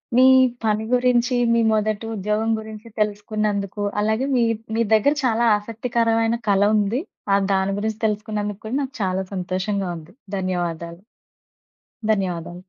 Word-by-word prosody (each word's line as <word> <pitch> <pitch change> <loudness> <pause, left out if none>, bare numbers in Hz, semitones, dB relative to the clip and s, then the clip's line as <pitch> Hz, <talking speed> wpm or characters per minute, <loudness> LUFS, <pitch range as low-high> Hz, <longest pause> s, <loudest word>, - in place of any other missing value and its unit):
మీ 255 - +6 0.4
పని 215 0 +1
గురించి, 250 0 +3 0.2
మీ 235 - +3
మొదటి 215 0 0
ఉద్యోగం 210 +3 0
గురించి 220 +1 -9
తెలుసుకున్నందుకు, 210 -1 -1 0.2
అలాగే 220 +4 +1
మీ, 240 - +3 0.3
మీ 230 - +2
దెగ్గర 250 +7 +4
చాలా 235 -1 +2
ఆసక్తికరమైన 230 +1 0
కళ 195 0 +3
ఉంది. 210 +4 +1 0.3
ఆహ్, 200 0 +3
దాని 190 +1 +1
గురించి 220 +1 -3
తెలుసుకున్నందుకు 210 -1 -2
కూడా, 225 - -3
నాకు 270 -1 -5
చాలా 190 0 0
సంతోషంగా 190 +1 -2
ఉంది. 165 +3 -13 0.2
ధన్యవాదాలు. 175 -2 -3 1.1
ధన్యవాదాలు. 180 -2 -4
210 Hz, 130 wpm, -22 LUFS, 195-225 Hz, 1.1 s, మీ